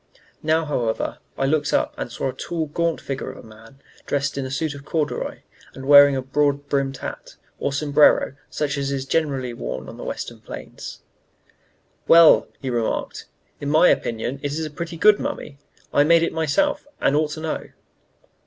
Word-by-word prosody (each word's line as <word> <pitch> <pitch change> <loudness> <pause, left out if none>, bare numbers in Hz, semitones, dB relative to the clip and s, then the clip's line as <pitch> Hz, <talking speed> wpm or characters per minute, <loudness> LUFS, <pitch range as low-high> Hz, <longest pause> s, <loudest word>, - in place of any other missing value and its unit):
Now, 160 +1 +1
however, 120 -7 -2 0.2
I 135 - +1
looked 145 +1 +1
up - - +1
and 120 - -5
saw 130 - -2
a - - -5
tall, 165 -2 -3
gaunt 165 +2 -1
figure 135 -1 -5
of - - -9
a - - -13
man 115 +5 -16 0.3
dressed 140 0 -1
in 135 -1 -3
a - - -7
suit 145 +3 -2
of 140 -1 -10
corduroy, 150 0 -2 0.3
and 135 - -8
wearing 145 -1 +8
a 130 - -2
broad 145 +1 0
brimmed 135 -1 -1
hat, - - -8 0.2
or - - -1
sombrero, 145 0 +4 0.2
such 145 -1 -2
as 140 0 -2
is 135 -1 -2
generally 135 -5 -1
worn 65 - -5
on - - -10
the - - -8
Western - - -5
plains. - - -9 1.0
"Well," 165 -1 +7
he 135 -2 -4
remarked, 115 -2 -2 0.3
"in 145 - -3
my 160 +4 +6
opinion, 120 +4 -1
it 145 0 -3
is 160 +1 -2
a 155 - -6
pretty 165 +2 -6
good 210 +4 +5
mummy. 140 -2 -5 0.3
I 145 - +5
made 165 +2 +5
it 165 - -1
myself, 160 - 0
and 140 - +2
ought 150 0 +2
to - - -7
know." 160 -1 -4
145 Hz, 185 wpm, -22 LUFS, 135-155 Hz, 1.0 s, wearing